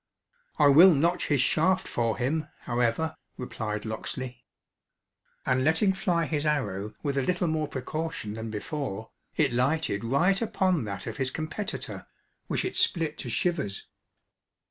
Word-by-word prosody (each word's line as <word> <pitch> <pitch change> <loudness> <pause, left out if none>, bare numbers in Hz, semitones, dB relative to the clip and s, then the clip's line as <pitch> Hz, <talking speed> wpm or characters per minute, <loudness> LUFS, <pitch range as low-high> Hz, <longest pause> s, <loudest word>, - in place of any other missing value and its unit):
"I 150 - +6
will 165 +5 +9
notch 170 +5 +1
his 145 -4 +3
shaft 185 +7 +2
for 115 -2 0
him, 150 +5 0
however," 120 +6 0 0.2
replied 110 -4 -4
Locksley. 120 +3 -5 1.0
And 130 0 +2
letting 160 +7 +3
fly 175 -3 +1
his 150 -2 -1
arrow 105 -9 -1
with 140 -2 0
a - - +2
little 180 +5 0
more 155 -1 0
precaution 140 -4 -4
than 110 +1 -5
before, 110 -1 -4 0.3
it - - +3
lighted 125 -3 +1
right 170 - +2
upon 185 - +1
that 100 -2 -5
of - - -5
his 135 -2 0
competitor, 155 +8 -5 0.4
which - - -1
it - - -3
split 160 -3 +1
to 125 - -5
shivers. 145 - -1
145 Hz, 145 wpm, -28 LUFS, 115-160 Hz, 1.0 s, will